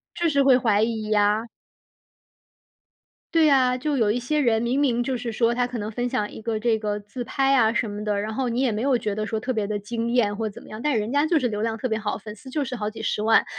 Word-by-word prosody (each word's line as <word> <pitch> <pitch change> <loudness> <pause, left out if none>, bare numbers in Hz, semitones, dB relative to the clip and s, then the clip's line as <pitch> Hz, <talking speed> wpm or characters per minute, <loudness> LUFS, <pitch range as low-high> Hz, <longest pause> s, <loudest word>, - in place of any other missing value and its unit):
就 340 -1 +1
是 280 -2 +3
会 260 -2 +6
怀 215 -4 +2
疑 220 -2 -2
啊。 210 +2 +2 1.9
对 325 -1 +5
呀， 255 -3 +4
就 290 +3 -1
有 220 -5 +2
一 245 - 0
些 300 +5 -1
人 230 -4 +2
明 240 +3 0
明 245 -4 +2
就 260 +1 -1
是 235 -1 -4
说， 230 +1 +2
他 245 - +1
可 245 0 -5
能 210 -1 -4
分 245 +3 -2
享 210 -5 -1
一 - - -10
个 220 -1 -2
这 225 0 +2
个 210 -1 -2
自 205 +5 -7
拍 270 +2 +1
啊 225 -3 +4
什 230 -1 -1
么 205 +1 -5
的， 210 -1 0
然 215 +1 -3
后 255 0 -1
你 235 +2 -1
也 255 -5 +1
没 215 - -2
有 265 -2 +2
觉 210 -3 -3
得 215 0 -2
说 220 0 -2
特 255 +4 -2
别 215 -3 -1
地 205 0 -2
惊 230 +3 -3
艳 210 -5 +2
或 220 0 -2
怎 200 - -12
么 - - -15
样， 215 +2 -8
但 295 0 +1
人 215 +5 -3
家 290 +1 +3
就 320 0 +2
是 255 - 0
流 210 -2 -3
量 225 0 -1
特 255 - -2
别 220 -1 -1
好， 210 -1 -3
粉 210 -1 -9
丝 260 +5 -13
就 290 +1 -1
是 250 - -4
好 210 -3 -2
几 215 - -9
十 210 - -1
万。 225 +1 +4
230 Hz, 305 characters per minute, -24 LUFS, 215-255 Hz, 1.9 s, 会